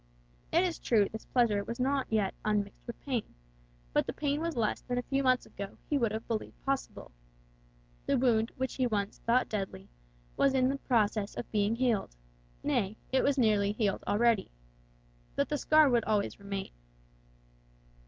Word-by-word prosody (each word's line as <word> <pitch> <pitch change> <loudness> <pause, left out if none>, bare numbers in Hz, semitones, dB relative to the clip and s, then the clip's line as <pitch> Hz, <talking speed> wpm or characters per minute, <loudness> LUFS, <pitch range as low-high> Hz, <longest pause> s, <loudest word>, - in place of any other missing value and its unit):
It 340 - +4
is 350 -3 -1
true 210 -4 +3
this 220 - -7
pleasure 225 -5 +2
was 230 +4 -6
not 270 +1 +1
yet 215 -3 +1
unmixed 210 0 -1
with 235 - -7
pain, 250 -6 -3 0.6
but - - +2
the - - -2
pain 290 0 -1
was 335 -2 -2
less 225 -3 0
than 245 -1 -3
a 245 - 0
few 275 +2 0
months 255 -1 +3
ago 200 0 -8
he 290 - +3
would 230 -4 +1
have 220 +1 -5
believed 225 -2 -4
possible. 275 0 -3 1.0
The - - +3
wound 230 -3 +2
which 260 -1 -2
he 255 -2 +1
once 205 -3 -2
thought 245 +2 +4
deadly, 195 - -4 0.5
was 275 -1 +3
in 260 +1 +3
process 215 -5 +1
of - - -6
being 210 +1 +2
healed; 235 - 0 0.5
nay, 200 +3 0
it 260 - +3
was 280 0 +2
nearly 210 -4 +3
healed 210 -3 0
already. 230 0 +3 0.9
But - - 0
the 295 - 0
scar 310 -1 +5
would 240 -4 +2
always 210 -1 0
remain. 200 -1 -5
230 Hz, 170 wpm, -31 LUFS, 210-260 Hz, 1.0 s, scar